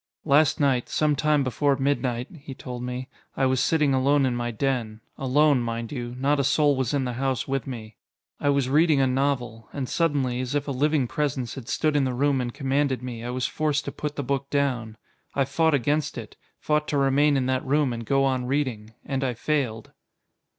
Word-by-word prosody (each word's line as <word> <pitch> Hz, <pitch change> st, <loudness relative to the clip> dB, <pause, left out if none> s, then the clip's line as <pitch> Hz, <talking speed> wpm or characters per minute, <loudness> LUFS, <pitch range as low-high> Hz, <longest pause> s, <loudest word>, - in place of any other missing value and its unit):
"Last 150 Hz, 0 st, +4 dB
night, 135 Hz, -4 st, +1 dB
some 150 Hz, -1 st, +2 dB
time 150 Hz, 0 st, +2 dB
before 140 Hz, +2 st, +1 dB
midnight," 135 Hz, -3 st, 0 dB
he 140 Hz, -3 st, -9 dB
told 125 Hz, -2 st, -7 dB
me, 125 Hz, +1 st, -4 dB, 0.3 s
"I 135 Hz, -, +2 dB
was 130 Hz, -1 st, +2 dB
sitting 150 Hz, -1 st, +2 dB
alone 135 Hz, +2 st, +3 dB
in 125 Hz, -2 st, 0 dB
my 120 Hz, 0 st, -2 dB
den. 115 Hz, -2 st, -2 dB, 0.2 s
Alone, 140 Hz, +1 st, +3 dB
mind 115 Hz, -1 st, -4 dB
you 120 Hz, -3 st, -5 dB
not 140 Hz, +3 st, +1 dB
a -, -, +2 dB
soul 145 Hz, +1 st, +3 dB
was 130 Hz, -3 st, -1 dB
in 135 Hz, -2 st, 0 dB
the 125 Hz, -, -3 dB
house 130 Hz, -3 st, -1 dB
with 135 Hz, -2 st, -2 dB
me. 110 Hz, -5 st, -7 dB, 0.4 s
I 145 Hz, -, +1 dB
was 140 Hz, -2 st, +2 dB
reading 150 Hz, +2 st, +4 dB
a 135 Hz, -, +4 dB
novel; 125 Hz, -4 st, -1 dB
and 135 Hz, -3 st, -4 dB
suddenly, 140 Hz, -7 st, 0 dB
as 130 Hz, +2 st, -3 dB
if 145 Hz, 0 st, -1 dB
a -, -, -1 dB
living 145 Hz, 0 st, +1 dB
presence 130 Hz, -4 st, -2 dB
had 130 Hz, -4 st, -8 dB
stood 155 Hz, -1 st, +1 dB
in 145 Hz, -, +3 dB
the 130 Hz, -1 st, -2 dB
room 140 Hz, 0 st, +2 dB
and 120 Hz, -1 st, -3 dB
commanded 135 Hz, 0 st, 0 dB
me, 120 Hz, -2 st, -6 dB
I 120 Hz, -, -4 dB
was 125 Hz, 0 st, -2 dB
forced 150 Hz, -2 st, -1 dB
to -, -, -3 dB
put 150 Hz, -1 st, -5 dB
the 145 Hz, -, -3 dB
book 140 Hz, +1 st, -2 dB
down. 125 Hz, -6 st, -1 dB, 0.4 s
I 140 Hz, -, +2 dB
fought 160 Hz, +3 st, +2 dB
against 145 Hz, +3 st, 0 dB
it, -, -, -8 dB, 0.2 s
fought 150 Hz, 0 st, 0 dB
to 145 Hz, -, 0 dB
remain 140 Hz, +1 st, +3 dB
in 130 Hz, -, 0 dB
that 130 Hz, 0 st, 0 dB
room 140 Hz, -1 st, +1 dB
and 115 Hz, 0 st, -5 dB
go 135 Hz, +4 st, +2 dB
on 130 Hz, -2 st, 0 dB
reading. 125 Hz, -5 st, -2 dB
And 135 Hz, 0 st, -2 dB
I 125 Hz, -2 st, -1 dB
failed." 130 Hz, -5 st, -2 dB
135 Hz, 215 wpm, -25 LUFS, 125-145 Hz, 0.4 s, Last